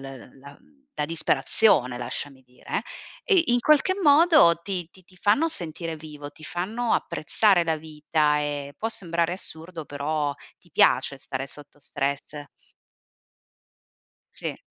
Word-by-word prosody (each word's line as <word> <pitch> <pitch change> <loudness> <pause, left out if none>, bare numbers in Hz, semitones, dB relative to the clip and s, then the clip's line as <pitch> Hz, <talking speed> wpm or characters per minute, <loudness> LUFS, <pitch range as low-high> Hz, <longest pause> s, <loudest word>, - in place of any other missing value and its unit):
mhmm, 135 -1 -11
la 140 +1 -13
mhmm, 280 0 -28
la 150 - -1
disperazione 160 - +2
lasciami 130 +2 -4
dire; 125 0 -5 0.4
e 390 -7 +4
in 245 0 +3
qualche 305 +8 +3
modo, 300 - +6
ti 180 -3 -4
ti 185 - -20
ti 185 0 -22
fanno 215 - +2
sentire 165 - -4
vivo, 150 -2 -10
ti 155 +1 -14
fanno 220 +9 -2
apprezzare 185 +3 +2
la 160 -1 0
vita 150 -1 0
e, 145 -1 -4
può 225 - -1
sembrare 170 -5 -1
assurdo, 165 -2 -4
però 145 0 -2 0.3
ti - - -26
piace 140 - +3
stare 135 0 -5
sotto 145 0 -10
stress. 140 +1 -3 1.9
Sì. - - -5
160 Hz, 135 wpm, -25 LUFS, 145-205 Hz, 1.9 s, modo